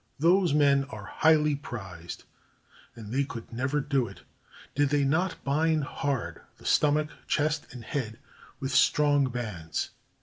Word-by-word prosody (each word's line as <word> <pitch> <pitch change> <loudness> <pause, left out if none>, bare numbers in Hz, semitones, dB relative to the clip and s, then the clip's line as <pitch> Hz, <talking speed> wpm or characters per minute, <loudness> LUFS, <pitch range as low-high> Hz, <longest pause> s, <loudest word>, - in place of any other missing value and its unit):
Those 175 +3 +4
men 140 -2 +4
are 110 -7 -9
highly 155 -2 +5
prized; 95 - -8 0.7
and 110 -1 -8
they 140 +2 +2
could 115 -4 -8
never 130 +5 0
do 135 -3 0
it, 100 - -12 0.5
did 145 0 +2
they 145 0 +2
not 160 +7 0
bind 155 +2 +2
hard 140 -2 -3 0.2
the - - -17
stomach, 150 0 +3 0.2
chest, 150 0 0
and 125 -2 -9
head 115 -3 -3 0.4
with 135 -1 -3
strong 145 -2 +4
bands. 105 -10 -4
140 Hz, 140 wpm, -28 LUFS, 120-150 Hz, 0.7 s, highly